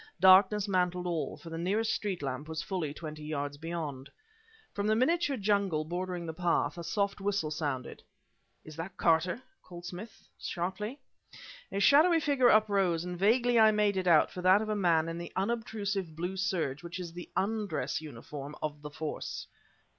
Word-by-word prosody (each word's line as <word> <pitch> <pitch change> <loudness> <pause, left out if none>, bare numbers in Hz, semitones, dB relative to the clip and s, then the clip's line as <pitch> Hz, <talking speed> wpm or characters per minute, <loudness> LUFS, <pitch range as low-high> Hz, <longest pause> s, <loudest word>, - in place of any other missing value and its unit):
Darkness 190 +3 +6
mantled 180 -2 0
all; 170 -3 -2
for 165 - -11
the 165 - -4
nearest 210 +6 +1
street 195 -7 -3
lamp 135 +2 -4
was 160 0 -3
fully 175 -7 -2
twenty 155 0 -8
yards 145 -2 -3
beyond. 155 -5 -5 0.6
From 205 0 -1
the 215 - +3
miniature 285 +3 +2
jungle 200 -7 +1
bordering 175 +1 -3
the 160 - -4
path, 165 -4 +1
a - - -5
soft 200 +3 -1
whistle 195 -6 -1
sounded. 145 -5 -3 0.6
"Is 155 - -10
that 180 +3 -6
Carter?" 170 +8 +2 0.2
called 175 -1 -11
Smith, 185 +5 -9
sharply. 190 +9 -4 0.7
A 200 - -1
shadowy 315 - +6
figure 280 -5 +3
uprose, 195 -6 +3
and 180 0 -4
vaguely 235 +5 +3
I 220 0 +8
made 210 -1 +2
it 185 -1 -1
out 160 -3 +5
for 180 - -6
that 185 +4 +5
of 215 - -5
a 215 - 0
man 170 -5 +2
in 165 0 -4
the 175 - -7
unobtrusive 200 -4 -2
blue 175 +4 -3
serge 180 -8 -1
which 170 0 -7
is 170 -2 -6
the 175 0 -8
undress 205 -6 -1
uniform 145 +1 -8
of 150 -1 -4
the 150 - -7
Force. 150 +1 -5
180 Hz, 175 wpm, -31 LUFS, 160-205 Hz, 0.7 s, I